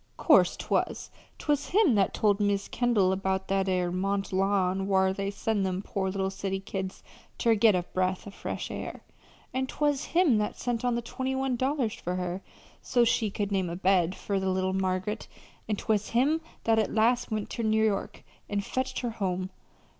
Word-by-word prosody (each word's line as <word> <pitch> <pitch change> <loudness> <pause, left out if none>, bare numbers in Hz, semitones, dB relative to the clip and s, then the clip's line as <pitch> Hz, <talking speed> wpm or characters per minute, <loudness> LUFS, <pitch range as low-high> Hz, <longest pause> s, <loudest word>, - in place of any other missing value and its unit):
'Course - - +5
'twas. - - -1 0.3
'Twas 290 -1 -1
him 385 - +4
that 200 -3 +3
told 205 -1 +2
Mis' 205 -1 +1
Kendall 210 -7 +2
'bout 190 0 -1
that 195 0 +1
'ere 180 -1 +1
Mont 195 +2 -1
Lawn 190 0 +1
whar 190 -1 +3
they 195 0 -2
sends 205 0 -1
them 190 0 -2
poor 190 -2 -2
little 190 0 -1
city 195 0 -3
kids 190 -1 -5 0.3
ter 230 -2 +3
get 220 -2 +5
a 180 - 0
breath 185 +1 -1
o' 200 - -8
fresh - - -5
air; - - -6 0.5
an' 260 0 -1
'twas 290 0 0
him 330 -11 +3
that 210 - -2
sent 240 -1 -2
on 245 -1 +1
the 235 - -2
twenty 260 +2 -3
one 265 -1 0
dollars 260 -2 0
for 180 +1 -4
her, 180 +1 -3 0.4
so's 240 -1 +2
she 220 -2 +1
could 205 0 -3
name 190 -3 0
a 170 - -4
bed 185 -1 +2
fur 200 -1 -2
little 190 0 0
Margaret; 190 +3 -1 0.4
an' 210 - +2
'twas 210 0 0
him 285 +7 +2 0.2
that 225 -1 +3
at 215 - 0
last 235 +3 +2
went 215 -2 -3
ter 235 - -3
New 220 0 +3
York 200 -2 -2 0.3
an' 205 -1 0
fetched 260 +5 -2
her 240 -2 -2
home. 190 -3 -2
200 Hz, 190 wpm, -28 LUFS, 190-235 Hz, 0.5 s, Course